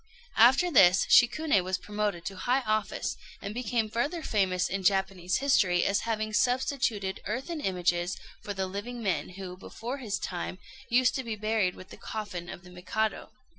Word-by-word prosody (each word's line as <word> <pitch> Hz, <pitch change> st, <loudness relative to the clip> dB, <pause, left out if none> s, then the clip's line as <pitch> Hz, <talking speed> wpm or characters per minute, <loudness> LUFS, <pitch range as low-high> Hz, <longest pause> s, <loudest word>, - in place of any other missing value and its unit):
After 265 Hz, +10 st, +6 dB
this 185 Hz, -, +6 dB
Shikuné 245 Hz, -, +5 dB
was 185 Hz, +1 st, -1 dB
promoted 210 Hz, -4 st, -3 dB
to 195 Hz, -, -4 dB
high 250 Hz, +7 st, +1 dB
office, 215 Hz, -3 st, -1 dB, 0.2 s
and 200 Hz, +1 st, -6 dB
became 235 Hz, -1 st, -1 dB
further 285 Hz, +10 st, -2 dB
famous 185 Hz, -, +1 dB
in 195 Hz, +1 st, -3 dB
Japanese 190 Hz, -2 st, +1 dB
history 195 Hz, -11 st, +3 dB
as 200 Hz, -, +2 dB
having 215 Hz, -1 st, -1 dB
substituted 235 Hz, -4 st, 0 dB
earthen 270 Hz, -, -3 dB
images 175 Hz, -2 st, 0 dB, 0.2 s
for 205 Hz, -, -5 dB
the 190 Hz, 0 st, -1 dB
living 205 Hz, +6 st, -6 dB
men 190 Hz, -4 st, -1 dB
who, 185 Hz, -2 st, -6 dB
before 235 Hz, +8 st, -6 dB
his 210 Hz, -6 st, -2 dB
time, 180 Hz, 0 st, -4 dB, 0.3 s
used 250 Hz, +1 st, +4 dB
to 265 Hz, -, -2 dB
be 230 Hz, -2 st, -4 dB
buried 215 Hz, -3 st, 0 dB
with 185 Hz, -, -12 dB
the -, -, -11 dB
coffin 185 Hz, -6 st, -6 dB
of 175 Hz, -, -8 dB
the 180 Hz, -, -14 dB
Mikado. 195 Hz, +4 st, -2 dB
210 Hz, 170 wpm, -29 LUFS, 185-240 Hz, 0.3 s, After